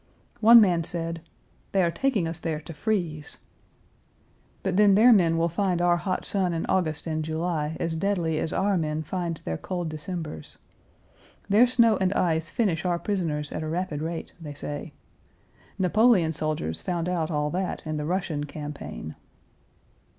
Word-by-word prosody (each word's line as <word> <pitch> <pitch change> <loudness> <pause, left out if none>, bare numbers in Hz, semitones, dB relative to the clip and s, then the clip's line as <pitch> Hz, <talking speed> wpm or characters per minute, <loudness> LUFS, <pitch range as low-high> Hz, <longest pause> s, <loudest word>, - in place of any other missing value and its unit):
One 230 +1 +9
man 180 -6 +3
said: 165 0 -3 0.5
"They 195 -1 +3
are 170 - +2
taking 225 -6 0
us 165 +1 -5
there 160 -2 -2
to 155 +2 -9
freeze." 160 -4 -2 1.3
But 190 -2 -1
then 205 -1 +6
their 235 +4 +7
men 170 -5 +3
will 165 +1 +2
find 180 +1 0
our 175 0 +3
hot 185 +2 -2
sun 185 -3 0
in 165 - -2
August 155 -5 0
and 155 -1 -2
July 160 -1 -2
as 165 -1 -1
deadly 165 -3 0
as 160 - -2
our 200 0 +1
men 155 0 -2
find 170 0 -3
their 80 -1 -3
cold 175 -3 -3
Decembers. 155 - -6 0.9
Their 215 +5 +6
snow 235 -4 +4
and 190 -1 +1
ice 165 -3 0
finish 190 -9 0
our 175 -2 +1
prisoners 165 -6 -2
at - - -4
a 155 - -4
rapid 165 -3 -2
rate, 165 +1 -5
they 150 -2 -7
say. 145 +1 -6 0.8
Napoleon's 190 -4 +3
soldiers 80 - -2
found 175 -1 -2
out 170 -3 -1
all 150 -2 -1
that 185 +2 -3
in 155 0 -3
the 150 - -3
Russian 170 -4 -2
campaign. 145 - -7
170 Hz, 165 wpm, -26 LUFS, 155-190 Hz, 1.3 s, One